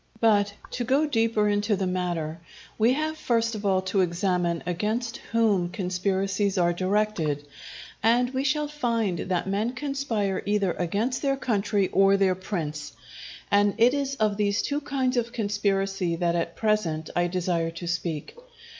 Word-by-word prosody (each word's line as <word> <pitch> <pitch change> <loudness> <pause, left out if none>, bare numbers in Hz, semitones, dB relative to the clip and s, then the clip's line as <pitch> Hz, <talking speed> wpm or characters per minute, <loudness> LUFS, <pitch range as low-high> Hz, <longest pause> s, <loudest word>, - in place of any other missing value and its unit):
But, 205 -3 +3 0.2
to 245 - -2
go 270 +5 +2
deeper 225 -6 +1
into 205 +1 +1
the 190 -1 -1
matter, 175 -3 -2 0.4
we 230 +3 +4
have 310 +2 -2
first 230 -1 +1
of 210 -1 -3
all 190 -1 +2
to 190 +1 +1
examine 175 -1 0
against 215 +7 -2
whom 210 -6 +2
conspiracies 195 +1 -1
are 175 -1 +3
directed; 185 -6 0 0.6
and 245 +2 +3
we 260 0 -1
shall 295 +2 +1
find 230 - -1
that 180 -2 -1
men 210 +5 0
conspire 260 -8 -2
either 205 -3 +2
against 205 +10 -1
their 275 -1 +1
country 205 -5 0
or 195 0 +4
their 195 -1 +3
prince; 165 - -4 0.6
and 205 0 +4
it 235 +3 +5
is 275 -1 -1
of 215 -4 +1
these 205 0 +1
two 290 +1 -1
kinds 265 -3 -1
of 235 0 0
conspiracy 195 -4 0
that 170 0 0
at 170 0 -2
present 185 -8 0
I 175 0 +2
desire 175 -2 -1
to 170 +1 -8
speak. 170 - -3
205 Hz, 155 wpm, -26 LUFS, 180-230 Hz, 0.6 s, it